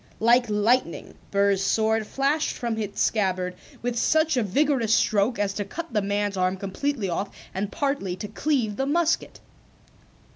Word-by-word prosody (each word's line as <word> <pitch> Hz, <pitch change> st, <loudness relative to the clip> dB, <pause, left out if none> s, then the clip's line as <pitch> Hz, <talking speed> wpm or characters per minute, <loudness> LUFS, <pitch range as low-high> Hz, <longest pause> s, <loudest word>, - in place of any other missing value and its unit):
Like 240 Hz, +1 st, +4 dB
lightning 210 Hz, -1 st, +1 dB, 0.2 s
Burr's 200 Hz, -1 st, +2 dB
sword 220 Hz, +1 st, +1 dB
flashed 285 Hz, +3 st, 0 dB
from 235 Hz, -2 st, -2 dB
its 210 Hz, -2 st, -4 dB
scabbard 185 Hz, -4 st, +1 dB, 0.3 s
with 240 Hz, -1 st, -1 dB
such 315 Hz, -1 st, +2 dB
a 250 Hz, -, +2 dB
vigorous 235 Hz, +1 st, +2 dB
stroke 215 Hz, +3 st, +2 dB
as 200 Hz, -1 st, 0 dB
to 205 Hz, -, -2 dB
cut 310 Hz, -, -7 dB
the 210 Hz, -, +2 dB
man's 200 Hz, 0 st, -1 dB
arm 185 Hz, +1 st, +1 dB
completely 205 Hz, +4 st, -2 dB
off 185 Hz, +3 st, -2 dB, 0.2 s
and 200 Hz, +2 st, -3 dB
partly 275 Hz, -11 st, -1 dB
to 210 Hz, -, -6 dB
cleave 220 Hz, -2 st, -1 dB
the 270 Hz, -, -1 dB
musket. 330 Hz, +2 st, 0 dB
220 Hz, 155 wpm, -25 LUFS, 200-270 Hz, 0.3 s, Like